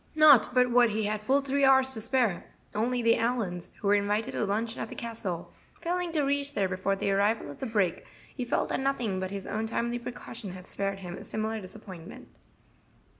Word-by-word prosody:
Not 300 Hz, -7 st, +8 dB
but 250 Hz, -1 st, +4 dB
what 240 Hz, -1 st, +6 dB
he 215 Hz, +1 st, -1 dB
had 210 Hz, 0 st, -1 dB
full 270 Hz, +6 st, +2 dB
three 280 Hz, +1 st, 0 dB
hours 265 Hz, -1 st, +5 dB
to 225 Hz, -4 st, -4 dB
spare, 230 Hz, -5 st, 0 dB, 0.2 s
only 240 Hz, +3 st, 0 dB
the 230 Hz, 0 st, +4 dB
Allyns, 225 Hz, -7 st, -2 dB
who 205 Hz, -, -4 dB
were 200 Hz, -, +5 dB
invited 205 Hz, +4 st, +1 dB
to -, -, -1 dB
luncheon 225 Hz, +3 st, -2 dB
at 220 Hz, -, -4 dB
the -, -, -8 dB
Castle, 210 Hz, -7 st, -5 dB, 0.3 s
failing 350 Hz, 0 st, -1 dB
to 305 Hz, -3 st, +2 dB
reach 280 Hz, +1 st, 0 dB
there 195 Hz, -, +2 dB
before 185 Hz, +1 st, -1 dB
the 195 Hz, -, -1 dB
arrival 200 Hz, -4 st, +1 dB
of -, -, -12 dB
the 265 Hz, -, -3 dB
brake, 200 Hz, -6 st, 0 dB, 0.3 s
he 255 Hz, -, -3 dB
felt 245 Hz, -, 0 dB
that -, -, -1 dB
nothing 245 Hz, -8 st, 0 dB
but 185 Hz, 0 st, -3 dB
his 195 Hz, -1 st, -4 dB
own 220 Hz, +1 st, -2 dB
timely 235 Hz, +1 st, -1 dB
precaution 235 Hz, -4 st, -7 dB
had 185 Hz, -1 st, -10 dB
spared 195 Hz, 0 st, -3 dB
him 175 Hz, -2 st, -6 dB
a -, -, -9 dB
similar 220 Hz, 0 st, -3 dB
disappointment. 185 Hz, -3 st, -10 dB
225 Hz, 210 wpm, -29 LUFS, 195-250 Hz, 0.3 s, Not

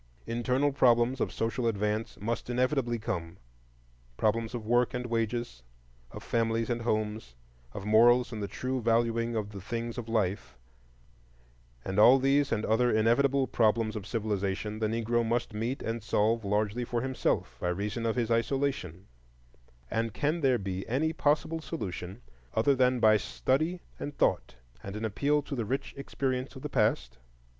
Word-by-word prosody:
Internal 125 Hz, +5 st, +1 dB
problems 125 Hz, -1 st, +3 dB
of -, -, 0 dB
social 115 Hz, +2 st, -1 dB
advance 105 Hz, 0 st, -1 dB
must 115 Hz, +4 st, -3 dB
inevitably 125 Hz, -1 st, +1 dB
come, 90 Hz, -5 st, -4 dB, 0.8 s
—problems 115 Hz, +2 st, 0 dB
of 115 Hz, -3 st, -5 dB
work 120 Hz, +2 st, +2 dB
and 125 Hz, 0 st, -3 dB
wages, 115 Hz, -, -2 dB, 0.5 s
of -, -, -10 dB
families 115 Hz, 0 st, 0 dB
and 120 Hz, 0 st, -1 dB
homes, 110 Hz, -, -2 dB, 0.4 s
of 100 Hz, -, -6 dB
morals 120 Hz, +3 st, +5 dB
and 110 Hz, -2 st, -5 dB
the 100 Hz, -, -2 dB
true 130 Hz, +6 st, -3 dB
valuing 115 Hz, 0 st, +1 dB
of 105 Hz, -2 st, -2 dB
the 100 Hz, -2 st, -8 dB
things 115 Hz, +3 st, -4 dB
of 115 Hz, -1 st, -7 dB
life; 95 Hz, -, -1 dB, 1.3 s
and 95 Hz, +2 st, -1 dB
all 125 Hz, +5 st, +8 dB
these 140 Hz, +1 st, +2 dB
and 110 Hz, -1 st, 0 dB
other 120 Hz, +3 st, +3 dB
inevitable 125 Hz, +5 st, +3 dB
problems 110 Hz, -2 st, +1 dB
of 105 Hz, -1 st, -6 dB
civilization 105 Hz, -1 st, -2 dB
the 110 Hz, -, +1 dB
Negro 115 Hz, +1 st, 0 dB
must 115 Hz, 0 st, -1 dB
meet 115 Hz, +5 st, -3 dB
and 115 Hz, +1 st, -3 dB
solve 110 Hz, +2 st, +1 dB
largely 105 Hz, +3 st, 0 dB
for 120 Hz, 0 st, -2 dB
himself, 130 Hz, -1 st, -1 dB
by 90 Hz, -, -1 dB
reason 105 Hz, +6 st, -2 dB
of 110 Hz, -, 0 dB
his 120 Hz, -2 st, -1 dB
isolation; 115 Hz, -, -1 dB, 0.9 s
and 115 Hz, -1 st, -1 dB
can 155 Hz, +4 st, 0 dB
there 130 Hz, -3 st, +3 dB
be 95 Hz, -2 st, -4 dB
any 155 Hz, +7 st, 0 dB
possible 160 Hz, +1 st, +1 dB
solution 100 Hz, -, -6 dB, 0.3 s
other 140 Hz, +6 st, +4 dB
than 125 Hz, -1 st, +2 dB
by 110 Hz, -1 st, +6 dB
study 155 Hz, -, -1 dB, 0.2 s
and 145 Hz, 0 st, -6 dB
thought -, -, +1 dB, 0.3 s
and 100 Hz, +1 st, -7 dB
an 110 Hz, +1 st, -3 dB
appeal 145 Hz, +7 st, +1 dB
to 145 Hz, -, -7 dB
the 120 Hz, -, -1 dB
rich 130 Hz, +6 st, -3 dB
experience 135 Hz, -1 st, -3 dB
of 130 Hz, -, -10 dB
the 150 Hz, -, -3 dB
past? 105 Hz, -, 0 dB
115 Hz, 160 wpm, -29 LUFS, 105-125 Hz, 1.3 s, all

